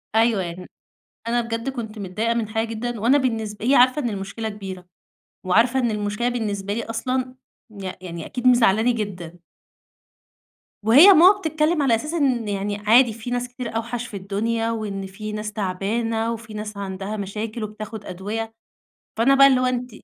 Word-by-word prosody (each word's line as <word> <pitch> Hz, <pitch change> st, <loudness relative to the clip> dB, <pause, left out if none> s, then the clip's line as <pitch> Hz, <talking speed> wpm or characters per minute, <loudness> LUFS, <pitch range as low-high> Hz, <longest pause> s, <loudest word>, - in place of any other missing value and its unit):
أيوه 225 Hz, -3 st, +3 dB
يعني، 175 Hz, +1 st, -7 dB, 0.6 s
أنا 240 Hz, +1 st, +1 dB
بجد 230 Hz, +2 st, -3 dB
كنت 225 Hz, -5 st, -6 dB
متضايقة 210 Hz, +4 st, -1 dB
من 230 Hz, -2 st, -1 dB
حاجة 225 Hz, +1 st, -1 dB
جدًا، 230 Hz, +1 st, -4 dB
وأنا 245 Hz, +7 st, +4 dB
بالنسب 220 Hz, -6 st, -2 dB
هي 265 Hz, +4 st, +4 dB
عارفة 255 Hz, +4 st, +5 dB
إن 240 Hz, -, -1 dB
المشكلة 200 Hz, +2 st, -4 dB
كبيرة، 190 Hz, -3 st, -8 dB, 0.6 s
وعارفة 230 Hz, +8 st, +3 dB
إن 240 Hz, -3 st, +1 dB
المشكلة 210 Hz, +3 st, -1 dB
بالنسبة 205 Hz, -4 st, -3 dB
لي 230 Hz, -, -3 dB
أصلًا 255 Hz, +3 st, -3 dB, 0.3 s
يع 195 Hz, -3 st, -6 dB
يعني 170 Hz, -3 st, -7 dB
أكيد 250 Hz, 0 st, -2 dB
مزعِّلاني 235 Hz, -2 st, +4 dB
جدًا. 180 Hz, -6 st, -5 dB, 1.4 s
وهي 255 Hz, -, +8 dB
ماما 370 Hz, +5 st, +7 dB
بتتكلَّم 320 Hz, -2 st, +1 dB
على 260 Hz, -5 st, +3 dB
أساس 300 Hz, +8 st, -4 dB
إن 260 Hz, -8 st, +1 dB
يعني 205 Hz, 0 st, -2 dB
عادي، 225 Hz, +3 st, +4 dB
في 230 Hz, +2 st, -8 dB
ناس 245 Hz, 0 st, -2 dB
كتير 245 Hz, -2 st, -7 dB
أوحش 235 Hz, +1 st, -3 dB
في 205 Hz, -, -7 dB
الدنيا، 225 Hz, +4 st, -1 dB
وإن 205 Hz, -4 st, -4 dB
في 210 Hz, +3 st, -7 dB
ناس 210 Hz, 0 st, -5 dB
تعبانة، 220 Hz, +4 st, -1 dB
وفي 225 Hz, -1 st, -9 dB
ناس 210 Hz, 0 st, -6 dB
عندها 195 Hz, +1 st, -5 dB
مشاكل 215 Hz, +3 st, -4 dB
وبتاخُد 215 Hz, 0 st, -7 dB
أدوية. 210 Hz, +5 st, -5 dB, 0.6 s
فأنا 240 Hz, +5 st, +4 dB
بقى 275 Hz, 0 st, +8 dB
اللي 260 Hz, -2 st, +4 dB
هو 255 Hz, -, +1 dB
أنتِ 250 Hz, 0 st, -2 dB
225 Hz, 170 wpm, -22 LUFS, 205-245 Hz, 1.4 s, وهي